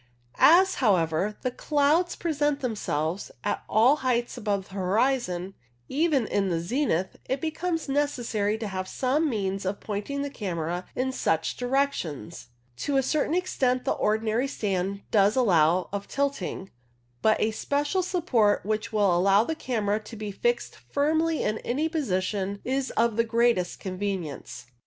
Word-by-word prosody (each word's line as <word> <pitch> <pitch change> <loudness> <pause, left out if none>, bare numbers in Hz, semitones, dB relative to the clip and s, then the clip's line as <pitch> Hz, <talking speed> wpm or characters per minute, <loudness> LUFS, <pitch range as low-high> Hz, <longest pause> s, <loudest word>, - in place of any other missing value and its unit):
As, 375 +4 +7
however, 190 -2 +2
the 255 - 0
clouds 300 +6 +1
present 295 -3 0
themselves 190 - -2
at 205 - -1
all 245 +7 +5
heights 245 -3 0
above 205 -5 -2
the - - -15
horizon, 195 -1 0 0.4
even 295 -4 +2
in 200 -2 0
the 170 -2 0
zenith, 190 - -1
it 265 - -1
becomes 325 +2 -2
necessary 240 -7 0
to 220 -1 -4
have 185 -1 -4
some 280 +9 +1
means 195 -4 -2
of 190 +1 -2
pointing 220 +7 -3
the 285 - -4
camera 175 - -3
in 260 +1 0
such 160 -10 0
direc 270 +3 +1
tions. 145 -10 -6 0.3
To 280 - 0
a 270 - +3
certain 305 +4 0
extent 260 -9 0
the - - +1
ordinary 220 +4 +1
stand 200 -5 -2
does 205 0 +4
allow 180 -7 +3
of 200 0 -4
tilting, 275 -9 -2 0.5
but 220 - +3
a 220 - +1
special 290 - 0
support 295 - +1
which 215 +1 -2
will 205 -5 +3
allow 195 +4 +4
the 320 - -2
camera 220 -8 -1
to 220 +2 -11
be 210 -1 -5
fixed 480 - -1
firmly 315 +2 0
in 215 - -1
any 290 +6 -1
position 200 - -1
is 265 +1 -1
of 230 -1 +2
the 230 - +4
greatest 230 -5 +1
convenience. 185 -10 -4
220 Hz, 150 wpm, -26 LUFS, 195-280 Hz, 0.5 s, As